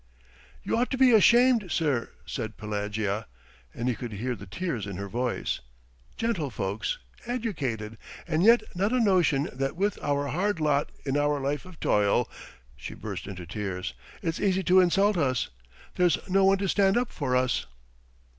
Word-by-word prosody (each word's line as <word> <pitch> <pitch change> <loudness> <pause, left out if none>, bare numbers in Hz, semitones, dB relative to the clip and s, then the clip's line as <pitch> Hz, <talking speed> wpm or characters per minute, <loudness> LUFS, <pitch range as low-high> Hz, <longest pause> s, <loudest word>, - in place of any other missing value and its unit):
"You - - 0
ought 245 +2 +1
to 260 - -2
be 260 -1 +6
ashamed, 235 -1 +5
sir," 145 -6 0 0.2
said 110 -3 -5
Pelagea, 105 0 -2 0.4
and 120 - -4
he 125 - +2
could 115 -1 -6
hear 120 +5 -2
the 100 -2 -11
tears 125 - -3
in 100 - -5
her 100 +2 -5
voice. 120 +4 -2 0.6
"Gentlefolks... 140 - -2 0.3
educated, 140 - -3 0.3
and 165 -1 +1
yet 230 +5 +6
not 195 +5 0
a 255 - +3
notion 175 - +3
that 135 +3 -2
with 200 +3 0
our 145 -1 0
hard 185 +6 0
lot... 150 -2 +1
in 135 0 0
our 145 0 +1
life 140 +4 -2
of 185 -3 -13
toil" 105 +3 +2 0.5
she - - -8
burst - - -6
into 90 -3 -7
tears. 90 -2 -4 0.3
"It's 165 0 -1
easy 190 -1 +1
to 185 +1 +5
insult 195 +3 +3
us. 130 - +1 0.4
There's 175 -3 +3
no 195 +1 +3
one 195 0 +5
to 195 0 -1
stand 195 +2 +3
up 245 -1 0
for 130 -5 -1
us." 125 -2 +1
145 Hz, 165 wpm, -27 LUFS, -, 0.6 s, be